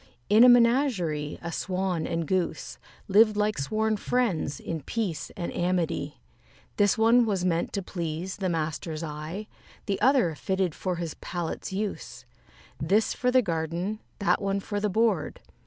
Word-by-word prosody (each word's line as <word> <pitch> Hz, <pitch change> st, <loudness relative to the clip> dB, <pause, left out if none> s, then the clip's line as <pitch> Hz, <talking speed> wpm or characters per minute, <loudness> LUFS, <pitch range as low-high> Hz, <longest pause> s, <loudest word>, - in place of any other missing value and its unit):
In 215 Hz, +3 st, +7 dB
a 250 Hz, -, +9 dB
menagerie 235 Hz, -, +3 dB
a 170 Hz, -, -4 dB
Swan 185 Hz, -2 st, -2 dB
and 165 Hz, 0 st, -2 dB
Goose 185 Hz, 0 st, -2 dB, 0.3 s
Lived 210 Hz, +1 st, +5 dB
like 210 Hz, -3 st, +1 dB
sworn 215 Hz, +9 st, 0 dB
friends, 200 Hz, -, 0 dB
in 160 Hz, -2 st, -4 dB
peace 190 Hz, -, -3 dB
and 175 Hz, -, -4 dB
amity. 175 Hz, -, -1 dB, 0.6 s
This 205 Hz, +2 st, +3 dB
one 230 Hz, +2 st, +5 dB
was 195 Hz, -5 st, 0 dB
meant 170 Hz, -2 st, 0 dB
to 200 Hz, -, -2 dB
please 175 Hz, 0 st, -4 dB
the 190 Hz, -2 st, -1 dB
master's 160 Hz, 0 st, -3 dB
eye, 155 Hz, +6 st, -5 dB, 0.4 s
The 200 Hz, -2 st, -2 dB
other 250 Hz, -, +4 dB
fitted 190 Hz, +2 st, -1 dB
for 185 Hz, +2 st, -3 dB
his 170 Hz, -2 st, -4 dB
palate's 175 Hz, 0 st, -5 dB
use: 200 Hz, +1 st, -4 dB, 0.5 s
This 200 Hz, +8 st, +2 dB
for 250 Hz, -, 0 dB
the 255 Hz, 0 st, +4 dB
garden, 170 Hz, +4 st, -2 dB, 0.2 s
that 200 Hz, -, +1 dB
one 195 Hz, 0 st, 0 dB
for 205 Hz, +1 st, -3 dB
the 210 Hz, 0 st, 0 dB
board. 215 Hz, -4 st, +1 dB
190 Hz, 155 wpm, -27 LUFS, 165-215 Hz, 0.6 s, a